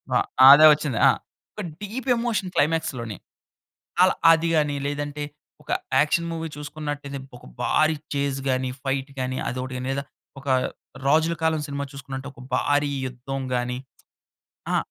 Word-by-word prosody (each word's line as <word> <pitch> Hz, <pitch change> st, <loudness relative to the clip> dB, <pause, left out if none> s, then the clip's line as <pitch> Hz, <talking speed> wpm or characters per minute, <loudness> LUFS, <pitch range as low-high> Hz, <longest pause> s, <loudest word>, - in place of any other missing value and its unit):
ఆ! -, -, +6 dB, 0.3 s
అదే 145 Hz, +3 st, +10 dB
వచ్చింది. 145 Hz, -6 st, -2 dB
ఆ! -, -, +7 dB, 0.4 s
ఒక 210 Hz, -, -6 dB, 0.2 s
డీప్ 235 Hz, +6 st, -5 dB
ఎమోషన్ 225 Hz, -6 st, -1 dB
క్లైమాక్స్‌లోని 140 Hz, -, 0 dB, 0.8 s
అలా, 185 Hz, -, +6 dB, 0.2 s
అది 165 Hz, 0 st, +3 dB
గాని, 150 Hz, -2 st, +2 dB
లేదంటే, 145 Hz, 0 st, -3 dB, 0.4 s
ఒక -, -, -22 dB, 0.3 s
యాక్షన్ 170 Hz, +3 st, +2 dB
మూవీ 165 Hz, 0 st, -3 dB
చూసుకున్నట్టయితే, 145 Hz, -1 st, -5 dB, 0.2 s
ఒక -, -, -16 dB, 0.2 s
భారీ 155 Hz, 0 st, +3 dB, 0.2 s
చేస్ 140 Hz, -1 st, -1 dB
గాని, 130 Hz, 0 st, 0 dB
ఫైట్ 135 Hz, 0 st, -1 dB
గాని, 130 Hz, 0 st, -2 dB
అదోకటి 130 Hz, +1 st, -4 dB
గాని, 125 Hz, +1 st, -4 dB
లేదా 140 Hz, +1 st, -2 dB, 0.4 s
ఒక 135 Hz, -, -14 dB, 0.6 s
రాజుల 160 Hz, +4 st, +3 dB
కాలం 160 Hz, -1 st, +2 dB
సినిమా 140 Hz, 0 st, -3 dB
చూసుకున్నట్లు, 135 Hz, 0 st, -7 dB
ఒక -, -, -14 dB
భారీ 145 Hz, +2 st, +2 dB, 0.2 s
యుద్ధం 130 Hz, +2 st, -5 dB
గాని. 125 Hz, 0 st, -1 dB, 1.0 s
ఆ! -, -, +4 dB
145 Hz, 140 wpm, -24 LUFS, 135-160 Hz, 1.0 s, అదే